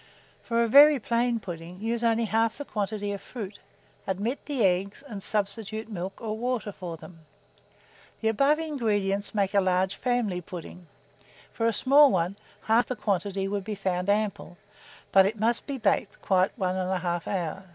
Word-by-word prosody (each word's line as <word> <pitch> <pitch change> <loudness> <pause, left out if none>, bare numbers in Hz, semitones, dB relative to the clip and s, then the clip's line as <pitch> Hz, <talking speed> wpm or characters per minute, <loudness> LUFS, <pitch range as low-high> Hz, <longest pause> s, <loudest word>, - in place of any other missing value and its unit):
For 235 0 +1
a - - +1
very 290 +5 +8
plain 235 +1 0
pudding, 175 -2 -8
use 230 +2 -2
only 230 0 +2
half 225 +1 +1
the 285 - -6
quantity 205 -2 -3
of 200 -1 -5
fruit, 210 -5 -8 0.5
omit 205 +8 -2
the 275 -6 0
eggs, 190 +7 0
and 205 -5 -7
substitute 215 +2 -2
milk 190 0 -5
or 215 -2 -3
water 235 -2 -2
for 175 -4 -7
them. 165 0 -13 1.0
The 220 - +2
above 275 +7 +3
ingredients 210 -11 -1
make 200 -1 +1
a 200 - +4
large 185 0 +1
family 235 -8 -1
pudding; 175 0 -9 0.7
for 230 - 0
a - - +3
small 280 +6 +6
one, 180 +1 0 0.3
half 225 +2 +3
the 255 - -3
quantity 195 -2 -1
would 200 0 -2
be 210 +1 -4
found 185 -1 -2
ample; 205 -3 -1 0.5
but 195 0 +6
it 215 +1 -4
must 230 +2 +1
be 280 -2 -3
baked 205 -3 0
quite 185 -1 +2
1 185 -4 0
1/2 180 -2 -2
hour. 185 -1 -3
205 Hz, 170 wpm, -27 LUFS, 190-230 Hz, 1.0 s, very